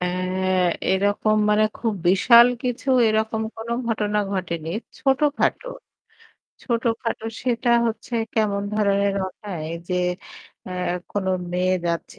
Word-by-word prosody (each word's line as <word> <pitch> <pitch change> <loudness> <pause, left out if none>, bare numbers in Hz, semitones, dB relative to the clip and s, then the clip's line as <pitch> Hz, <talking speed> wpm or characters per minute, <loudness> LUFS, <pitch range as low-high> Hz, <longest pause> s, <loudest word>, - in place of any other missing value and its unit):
অ্যা 180 - 0 0.9
এরকম 205 +2 +1
মানে 210 +1 +4
খুব 225 -2 -1 0.2
বিশাল 235 +6 +7 0.2
কিছু 250 +1 -3 0.2
এরকম 220 0 0
কোন 225 +1 -8 0.2
ঘটনা 210 -2 0
ঘটেনি, 170 -4 -3 0.3
ছোটখাটো। 290 - +1 0.9
ছোটখাটো 230 -1 -2 0.2
সেটা 245 -1 0 0.2
হচ্ছে 230 +2 -4 0.2
কেমন 205 -2 +1
ধরনের 200 -1 +2
ঘটায় 185 -5 -7 0.2
যে 180 - -1 0.7
অ্যা 185 - -6 0.4
কোন 200 -2 -2 0.3
মেয়ে 185 +1 +1
যাচ্ছে 170 0 -3
215 Hz, 110 wpm, -23 LUFS, 190-230 Hz, 0.9 s, বিশাল